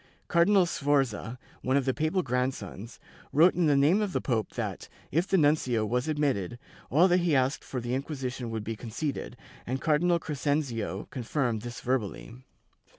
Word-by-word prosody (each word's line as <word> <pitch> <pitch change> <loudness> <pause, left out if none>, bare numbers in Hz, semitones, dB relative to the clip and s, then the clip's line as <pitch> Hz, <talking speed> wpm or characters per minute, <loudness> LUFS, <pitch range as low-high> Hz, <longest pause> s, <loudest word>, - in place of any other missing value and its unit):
Car 170 0 +4
dinal 195 -2 +5
Sforza, 135 -6 0 0.2
one 130 +2 +2
of 135 - 0
the 130 - +1
papal 160 +5 0
grandsons, 125 - -3 0.3
wrote 165 +5 +6
in 175 -3 +2
the 145 - +4
name 155 +10 +4
of 205 -4 -2
the - - +1
pope 110 -6 -1
that, - - -4 0.2
if 165 +6 +1
the 195 - +3
nuncio 145 -8 +2
was 125 +5 -1
admitted, 140 - 0 0.3
all 165 +7 +5
that 180 -1 +4
he 170 -4 +2
asked 130 +1 +1
for 130 - -4
the 120 +1 -3
Inquisition 130 -3 -3
would 110 -1 -3
be 115 +1 -4
conceded, 120 +3 -4 0.3
and 130 +2 -1
Cardinal 170 +3 +2
Crescenzio 140 - -2
confirmed 120 -2 -1
this 120 +1 -7
verbally. 120 -3 -2
135 Hz, 170 wpm, -28 LUFS, 120-155 Hz, 0.3 s, wrote